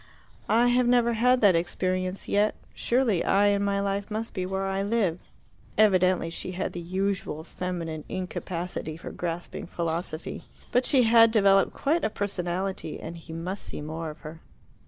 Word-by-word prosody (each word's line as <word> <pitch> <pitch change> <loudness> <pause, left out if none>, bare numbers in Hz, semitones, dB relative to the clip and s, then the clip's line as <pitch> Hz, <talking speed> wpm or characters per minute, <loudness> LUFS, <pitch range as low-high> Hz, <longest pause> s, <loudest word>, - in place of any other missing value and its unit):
"I 235 +2 +4
have 245 0 +3
never 240 -1 +4
had 250 +3 +3
that 200 -5 +6
experience 185 +2 -1
yet. 210 +1 +2 0.2
Surely 235 -7 +1
I 200 +1 +3
and 200 0 +1
my 200 0 +1
life 200 0 -2
must 220 +1 -4
be 185 -1 -2
where 190 +1 -2
I 195 0 -1
live." 200 -5 0 0.6
Evidently 185 -5 +3
she 185 +2 -5
had 185 +2 -3
the 175 - -5
usual 185 -2 -2
feminine 165 -3 -5
incapacity 180 -3 -4
for - - -8
grasping 175 -1 -5
philosophy. 165 -1 -4 0.3
But 250 +1 +2
she 260 -3 +5
had 230 0 +7
developed 195 -3 +4
quite 310 +3 +1
a - - +2
personality, 190 -3 -3
and 165 +2 -7
he 165 0 -11
must 175 +5 -4
see - - -5
more 160 +2 -5
of 150 - -11
her. 160 +1 -9
190 Hz, 165 wpm, -27 LUFS, 170-215 Hz, 0.6 s, had